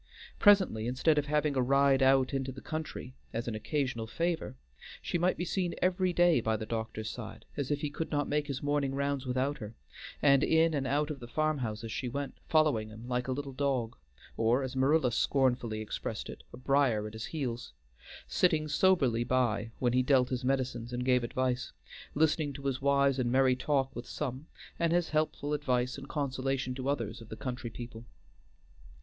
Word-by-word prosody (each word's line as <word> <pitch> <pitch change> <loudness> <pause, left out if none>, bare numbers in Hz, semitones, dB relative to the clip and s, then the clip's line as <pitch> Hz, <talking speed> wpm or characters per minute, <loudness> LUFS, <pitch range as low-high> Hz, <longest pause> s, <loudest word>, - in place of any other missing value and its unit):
Presently, 190 - +5
instead 150 +5 +2
of 145 - -3
having 150 -1 +1
a 130 - +2
ride 140 +1 +4
out 135 0 +4
into 135 -1 -1
the 130 - -9
country 155 -5 -5 0.2
as 115 +2 -3
an 115 - -2
occasional 120 0 -2
favor, 165 - -2 0.4
she 175 - -2
might 180 +2 +2
be 175 - -2
seen 180 -1 -1
every 185 0 +2
day 175 -6 +4
by 110 -1 0
the 110 - -5
doctor's 110 -1 -4
side, 110 -2 -8
as 140 -3 -3
if 145 -1 0
he 150 - -2
could 160 +2 -4
not 145 -1 0
make 150 0 0
his 140 -2 -4
morning 145 -2 0
rounds 140 -1 -1
without 130 +3 0
her; 110 0 -8 0.4
and 140 -1 +5
in 160 0 +4
and 140 -3 -1
out 150 +3 +1
of 145 - -6
the 120 - -9
farm 155 +3 0
houses 110 -2 -4
she 125 +2 -3
went, 140 +2 -4
following 150 -9 +3
him 110 +2 -10
like 125 0 -1
a - - -1
little 140 +1 -3
dog, 130 -4 -1 0.4
or, 115 +4 +2
as 130 0 -5
Marilla 135 0 +3
scornfully 120 -4 +1
expressed 110 - -5
it, - - -11
a - - -10
briar 130 -5 +2
at 110 - -7
his 110 0 -5
heels; 125 - -4 0.5
sitting 160 -4 +2
soberly 145 -8 +3
by 120 -4 +1
when 120 -2 +1
he 130 - +4
dealt 130 -1 +3
his 125 -1 -2
medicines 125 -3 -1
and 125 0 -3
gave 125 -1 +3
advice, 125 +1 -1 0.4
listening 155 -1 +2
to 140 - -9
his 135 -1 -1
wise 140 -1 +3
and 120 -2 +1
merry 130 0 +4
talk 135 +1 0
with 120 - -6
some, 140 +1 -4 0.3
and 170 0 +2
his 175 -1 +1
helpful 155 -1 -1
advice 125 -4 0
and - - -9
consolation 135 -3 -1
to 130 +1 -3
others 115 -6 -2
of 110 - -12
the 110 - -6
country 125 -2 -4
people. 115 0 -8
135 Hz, 195 wpm, -31 LUFS, 120-145 Hz, 0.5 s, Presently